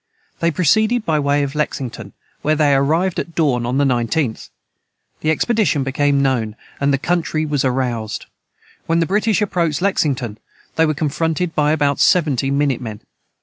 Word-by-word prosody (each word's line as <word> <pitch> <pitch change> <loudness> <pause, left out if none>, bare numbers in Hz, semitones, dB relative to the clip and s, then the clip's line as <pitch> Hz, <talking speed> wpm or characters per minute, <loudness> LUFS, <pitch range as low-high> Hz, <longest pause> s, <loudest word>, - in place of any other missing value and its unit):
They 170 - +2
proceeded 215 +9 +2
by 155 -2 +1
the - - +1
way 145 0 +1
of 135 -1 -3
Lexington, 125 -8 -4 0.3
where 155 +1 +1
they 145 -2 +3
arrived 160 +7 +1
at 170 - -6
dawn 125 -7 +1
of 125 +2 -1
the 145 - +3
19th. 125 0 -1 0.7
The 155 - -1
expedition 190 - +1
became 140 +1 +1
known, 115 -6 0 0.2
and 140 0 +2
the 135 - +2
country 160 0 -1
was 145 -3 0
aroused. 125 -4 -2 0.6
When 165 0 +2
the 165 - +2
British 210 +3 +1
approached 170 -6 0
Lexington, 135 - -1 0.4
they 160 0 +3
were 155 - 0
confronted 160 +3 -1
by 150 0 +2
about 145 -2 +1
seventy 145 -7 +3
minute 140 -2 0
men. 110 -4 -7
145 Hz, 165 wpm, -19 LUFS, 135-165 Hz, 0.7 s, they